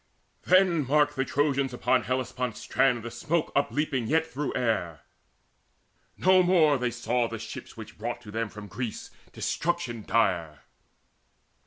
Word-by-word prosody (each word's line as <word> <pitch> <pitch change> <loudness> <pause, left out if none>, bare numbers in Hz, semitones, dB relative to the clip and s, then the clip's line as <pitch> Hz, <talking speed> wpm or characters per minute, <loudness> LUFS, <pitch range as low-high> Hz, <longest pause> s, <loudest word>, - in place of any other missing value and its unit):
Then 180 -6 +4
marked 145 +1 +3
the 135 - +1
Trojans 140 -2 0
upon 125 +1 +2
Hellespont's 125 -1 -2
strand 125 -4 +1
The 120 - -6
smoke 155 +8 -1
upleaping 140 -3 0
yet 160 +4 +2
through 150 -3 -4
air: 85 -10 -1 1.2
no 185 +1 +5
more 175 -5 +4
Saw 120 0 0
they 115 - -6
the - - -7
ships 115 - -9
which - - -10
brought - - -3
to 105 - -11
them 115 0 -2
from 105 0 -10
Greece 115 +2 -6 0.2
Destruction 150 -9 -2
dire. 85 -10 0
130 Hz, 140 wpm, -27 LUFS, 115-150 Hz, 1.2 s, no